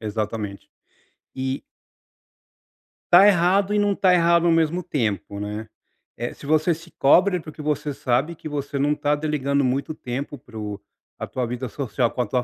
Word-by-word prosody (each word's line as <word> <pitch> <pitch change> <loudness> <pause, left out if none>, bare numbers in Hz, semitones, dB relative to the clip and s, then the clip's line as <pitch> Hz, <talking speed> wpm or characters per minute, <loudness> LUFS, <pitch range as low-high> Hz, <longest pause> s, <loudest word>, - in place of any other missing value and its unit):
Exatamente. 105 -1 -4 0.7
E 130 +1 -3 1.5
Tá 180 +3 +9
errado 195 +1 +4
e 210 - +3
não 205 -1 +2
tá 185 -2 +4
errado 170 0 +4
ao - - +4
mesmo 165 +2 +2
tempo, 105 -7 -2
né. 105 +2 -5 0.5
Eh, 120 +1 -4
se - - -13
você 155 +3 +3
se 165 +2 -12
cobra 180 +7 +5
é - - -5
porque 155 -1 -10
você 150 -1 -1
sabe 135 +7 0
que 155 - -8
você 140 -1 -4
não 145 +2 +2
tá 145 0 +1
delegando 140 -2 0
muito 135 +4 -1
tempo 140 +2 -5
para 115 -2 -13
o 105 -1 -5 0.4
pra - - -4
tua 125 -2 -3
vida 125 +1 -4
social 125 -2 -1
com 125 - -2
a - - 0
tua 125 +2 0
145 Hz, 180 wpm, -23 LUFS, 120-165 Hz, 1.5 s, Tá